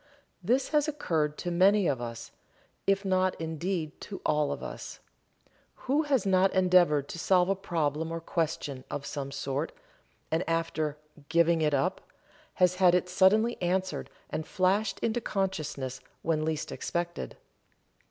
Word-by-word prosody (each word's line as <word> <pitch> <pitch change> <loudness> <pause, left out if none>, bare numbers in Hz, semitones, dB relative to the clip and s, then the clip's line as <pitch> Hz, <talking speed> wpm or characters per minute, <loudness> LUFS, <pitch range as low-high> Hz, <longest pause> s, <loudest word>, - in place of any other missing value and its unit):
This 250 +8 +1
has 300 0 +2
occurred 160 - -1
to 175 - -3
many 195 +3 +4
of 135 -6 0
us, 115 0 -6 0.6
if 195 0 +2
not 185 -1 +1
indeed 160 0 -3
to 200 - -7
all 150 -1 +2
of - - -5
us. - - -7 0.9
Who 280 +4 +3
has 275 -9 +1
not 190 0 +4
endeavored 180 -6 +4
to 170 - -6
solve 180 +1 +3
a 195 - +3
problem 160 -4 -1
or 165 - -3
question 160 -5 -2
of 145 -1 -4
some 140 -2 -4
sort 140 +2 -2 0.6
and 165 +3 +1
after 160 -2 -1 0.3
"giving 170 0 +3
it 150 -2 +2
up" 135 - 0 0.5
has 180 0 +3
had 180 -2 +5
it 180 0 +1
suddenly 210 +6 +3
answered 185 +1 -1 0.2
and 155 - -3
flashed 195 +3 +1
into 230 +1 0
consciousness 155 - -2 0.2
when 155 -2 +1
least 155 -1 -2
expected. 175 0 -4
175 Hz, 145 wpm, -29 LUFS, 155-190 Hz, 0.9 s, had